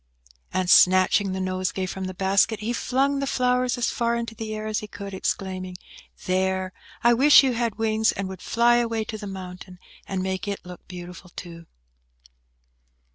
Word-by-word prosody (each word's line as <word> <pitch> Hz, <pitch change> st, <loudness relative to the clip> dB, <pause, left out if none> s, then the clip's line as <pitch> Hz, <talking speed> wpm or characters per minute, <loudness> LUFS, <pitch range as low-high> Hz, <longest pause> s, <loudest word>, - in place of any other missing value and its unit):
And, 185 Hz, 0 st, -1 dB
snatching 185 Hz, +2 st, +5 dB
the 190 Hz, -, -3 dB
nosegay 185 Hz, 0 st, -2 dB
from 190 Hz, +1 st, -5 dB
the 185 Hz, 0 st, -6 dB
basket, 200 Hz, +3 st, +2 dB
he 230 Hz, +3 st, -2 dB
flung 270 Hz, +3 st, +1 dB
the 275 Hz, -, -2 dB
flowers 250 Hz, -1 st, +1 dB
as 245 Hz, -, 0 dB
far 235 Hz, -1 st, 0 dB
into 230 Hz, -1 st, -3 dB
the 220 Hz, -1 st, -5 dB
air 215 Hz, 0 st, -5 dB
as 215 Hz, 0 st, -1 dB
he 210 Hz, -, -8 dB
could, 200 Hz, -1 st, -8 dB
exclaiming, 185 Hz, -1 st, -3 dB, 0.5 s
"There! 185 Hz, 0 st, 0 dB, 0.3 s
I 240 Hz, 0 st, +6 dB
wish 280 Hz, +4 st, +7 dB
you 260 Hz, -2 st, +2 dB
had 235 Hz, -2 st, -1 dB
wings, 220 Hz, 0 st, +2 dB
and 195 Hz, -, -4 dB
would 190 Hz, -1 st, -8 dB
fly 240 Hz, +1 st, +3 dB
away 230 Hz, -2 st, 0 dB
to 215 Hz, 0 st, -6 dB
the 205 Hz, -, -6 dB
mountain, 185 Hz, -1 st, -8 dB, 0.3 s
and 190 Hz, -1 st, -2 dB
make 190 Hz, +1 st, -3 dB
it 200 Hz, -2 st, -4 dB
look 180 Hz, -1 st, -11 dB
beautiful, 180 Hz, 0 st, -9 dB
too!" 170 Hz, -1 st, -9 dB
200 Hz, 180 wpm, -24 LUFS, 185-230 Hz, 0.5 s, wish